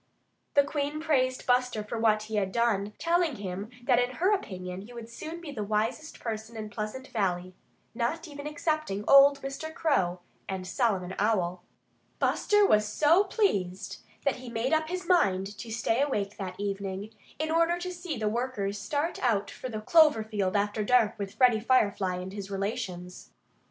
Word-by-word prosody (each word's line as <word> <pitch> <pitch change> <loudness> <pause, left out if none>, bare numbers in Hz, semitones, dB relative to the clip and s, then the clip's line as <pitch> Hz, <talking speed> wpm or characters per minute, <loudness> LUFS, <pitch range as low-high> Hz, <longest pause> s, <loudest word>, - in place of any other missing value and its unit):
The 285 - +7
Queen 290 +1 -2
praised 260 -5 +1
Buster 250 -3 +2
for 225 +2 -5
what 215 -1 +3
he 215 0 -3
had 195 -2 0
done, 210 -2 +1
telling 335 -3 +1
him 200 0 -5
that 245 -1 +4
in 250 +1 0
her 370 +8 +3
opinion 185 - -4
he 225 +5 -12
would 235 -1 -8
soon 315 +8 -7
be 335 -4 -8
the 220 -7 -4
wisest 220 +9 -2
person 225 0 -5
in 215 -1 -6
Pleasant 215 +6 -5
Valley 185 -4 -1 0.4
not 250 +9 -2
even 290 -1 -7
excepting 300 -9 -2
old 275 0 +7
Mr. 275 +4 -5
Crow 190 - +1 0.3
and 190 -1 -3
Solomon 190 -4 0
Owl. 185 -4 +1 0.6
Buster 415 -1 +3
was 210 - +4
so 310 - +4
pleased 195 - -1 0.3
that 280 - +2
he 250 -1 -9
made 235 +5 -1
up 315 0 +2
his 365 +1 -3
mind 200 - +2
to 225 +3 -7
stay 225 +2 0
awake 210 -8 -1
that 185 -2 -6
evening, 200 0 -3 0.3
in 315 +1 -2
order 335 +1 +3
to 365 +1 -5
see 345 -5 -5
the 215 -1 -1
workers 210 -3 -2
start 290 +10 -2
out 215 -5 +1
for 255 - -7
the 215 -2 -4
clover 305 -3 +5
field 205 -3 -2
after 205 +1 +1
dark 230 -1 +4
with 200 -1 -5
Freddie 245 -4 +5
Firefly 205 -6 +2
and 180 +1 -6
his 200 -1 -6
relations. 195 -3 -4
225 Hz, 175 wpm, -28 LUFS, 200-285 Hz, 0.6 s, The